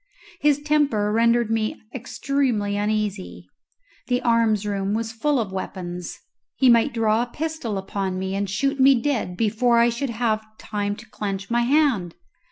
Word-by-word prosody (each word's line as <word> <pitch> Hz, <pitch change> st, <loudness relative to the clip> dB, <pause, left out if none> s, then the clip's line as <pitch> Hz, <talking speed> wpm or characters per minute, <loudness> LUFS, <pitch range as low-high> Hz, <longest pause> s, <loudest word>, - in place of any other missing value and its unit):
His 295 Hz, -2 st, +3 dB
temper 290 Hz, -9 st, +1 dB
rendered 230 Hz, 0 st, +2 dB
me 220 Hz, -1 st, -1 dB
extremely 250 Hz, -5 st, -1 dB
uneasy. 210 Hz, -2 st, -2 dB, 0.6 s
The 245 Hz, 0 st, +1 dB
arms 230 Hz, -3 st, +2 dB
room 200 Hz, 0 st, -1 dB
was 225 Hz, 0 st, -2 dB
full 275 Hz, +5 st, 0 dB
of 210 Hz, -5 st, -2 dB
weapons; 180 Hz, -2 st, -5 dB, 0.4 s
he 260 Hz, -, +4 dB
might 235 Hz, +4 st, +4 dB
draw 225 Hz, -1 st, +2 dB
a 245 Hz, -, -2 dB
pistol 310 Hz, -9 st, -3 dB
upon 190 Hz, -1 st, -3 dB
me 190 Hz, +1 st, -3 dB
and 200 Hz, 0 st, -2 dB
shoot 275 Hz, +8 st, -1 dB
me 265 Hz, -1 st, +6 dB
dead 230 Hz, -9 st, -2 dB
before 230 Hz, +2 st, +2 dB
I 235 Hz, 0 st, +5 dB
should 240 Hz, +3 st, -3 dB
have 225 Hz, -2 st, 0 dB
time 205 Hz, -1 st, -3 dB
to 235 Hz, -, -12 dB
clench 195 Hz, 0 st, -4 dB
my 240 Hz, 0 st, +3 dB
hand. 240 Hz, -, +2 dB
225 Hz, 160 wpm, -23 LUFS, 205-250 Hz, 0.6 s, me